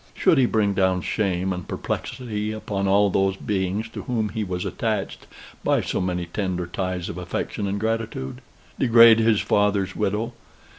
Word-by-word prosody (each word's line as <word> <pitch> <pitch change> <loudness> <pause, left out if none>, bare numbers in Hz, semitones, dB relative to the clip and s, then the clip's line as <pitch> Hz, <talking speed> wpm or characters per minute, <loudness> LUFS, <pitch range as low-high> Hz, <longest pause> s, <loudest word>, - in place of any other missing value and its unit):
Should 175 -7 +4
he 125 - +4
bring 105 -3 +1
down 95 -1 +2
shame 95 -2 0
and 90 -2 -6
perplexity 110 -4 -3
upon 100 -2 -3
all 100 +1 +4
those 95 0 +2
beings 100 +2 -2
to - - -7
whom 110 -4 -1
he 110 +2 -3
was 90 -2 -3
attached 110 -4 -3 0.4
by - - +2
so - - -2
many 90 -1 -1
tender 90 0 -2
ties 90 0 -3
of - - -5
affection 100 - -3
and 100 +1 -2
gratitude? 110 -11 -3 0.4
degrade 115 -2 +7
his 110 -2 +3
father's 100 -2 +1
widow? 105 +3 -1
100 Hz, 160 wpm, -24 LUFS, 95-110 Hz, 0.4 s, degrade